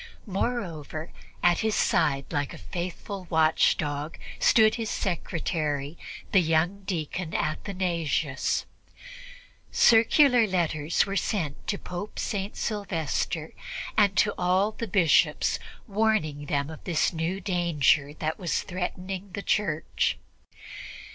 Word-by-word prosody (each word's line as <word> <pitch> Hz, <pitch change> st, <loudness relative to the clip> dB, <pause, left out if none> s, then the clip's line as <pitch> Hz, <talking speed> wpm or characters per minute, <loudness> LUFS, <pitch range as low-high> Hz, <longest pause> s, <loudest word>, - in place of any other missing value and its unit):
Moreover, 180 Hz, -, -3 dB, 0.3 s
at 175 Hz, -1 st, +4 dB
his 220 Hz, -1 st, +1 dB
side, 140 Hz, -5 st, +2 dB
like 145 Hz, -1 st, -1 dB
a 95 Hz, -, -13 dB
faithful 180 Hz, +2 st, -5 dB
watchdog, 155 Hz, -1 st, +2 dB, 0.2 s
stood 220 Hz, -1 st, +5 dB
his 225 Hz, -2 st, -3 dB
secretary, 155 Hz, -4 st, -2 dB, 0.4 s
the 195 Hz, -, +6 dB
young 165 Hz, +4 st, +1 dB
deacon 170 Hz, -1 st, -3 dB
Athanasius. 165 Hz, -5 st, -1 dB, 1.1 s
Circular 235 Hz, +1 st, +5 dB
letters 165 Hz, -4 st, +1 dB
were 195 Hz, 0 st, -4 dB
sent 165 Hz, -8 st, -2 dB
to 200 Hz, -, 0 dB
Pope 180 Hz, +4 st, -7 dB
St. 200 Hz, -2 st, -3 dB
Sylvester 165 Hz, -6 st, -2 dB, 0.4 s
and 200 Hz, -3 st, +3 dB
to 205 Hz, -, +4 dB
all 185 Hz, +4 st, +2 dB
the 230 Hz, +1 st, -5 dB
Bishops 185 Hz, -5 st, +3 dB, 0.3 s
warning 200 Hz, -, 0 dB
them 140 Hz, +2 st, -1 dB
of 155 Hz, -, -10 dB
the 165 Hz, -3 st, -1 dB
new 165 Hz, +4 st, -2 dB
danger 170 Hz, -, +2 dB
that 155 Hz, 0 st, -3 dB
was 175 Hz, -, -1 dB
threatening 185 Hz, +1 st, -4 dB
the 200 Hz, -, -4 dB
Church. 160 Hz, -7 st, 0 dB
175 Hz, 110 wpm, -27 LUFS, 155-200 Hz, 1.1 s, the